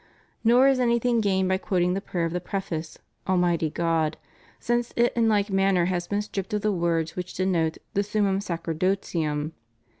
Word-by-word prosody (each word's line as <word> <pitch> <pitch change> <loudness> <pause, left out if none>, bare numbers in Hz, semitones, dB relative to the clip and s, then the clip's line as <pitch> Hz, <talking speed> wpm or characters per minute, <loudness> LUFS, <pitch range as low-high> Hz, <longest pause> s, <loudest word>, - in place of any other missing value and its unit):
Nor 245 +4 +6
is 270 -2 +3
anything 235 -1 +2
gained 190 -2 +1
by 190 0 +1
quoting 180 -3 +1
the 195 - -2
prayer 175 -3 -2
of 165 - -3
the 180 - -2
preface 170 -4 -4 0.3
"Almighty 175 -3 +2
God" 165 -1 0 0.4
since 240 0 -1
it 240 0 +3
in 230 -1 +3
hke 205 -1 +2
manner 195 -2 +3
has 175 -1 -1
been 205 0 -1
stripped 200 -1 -4
of 210 - -1
the 210 +1 +1
words 170 -3 0
which 180 0 -5
denote 170 -4 0 0.2
the 200 - +2
summum 205 -2 0
sacerdotium. 165 -4 -2
190 Hz, 175 wpm, -25 LUFS, 170-210 Hz, 0.4 s, Nor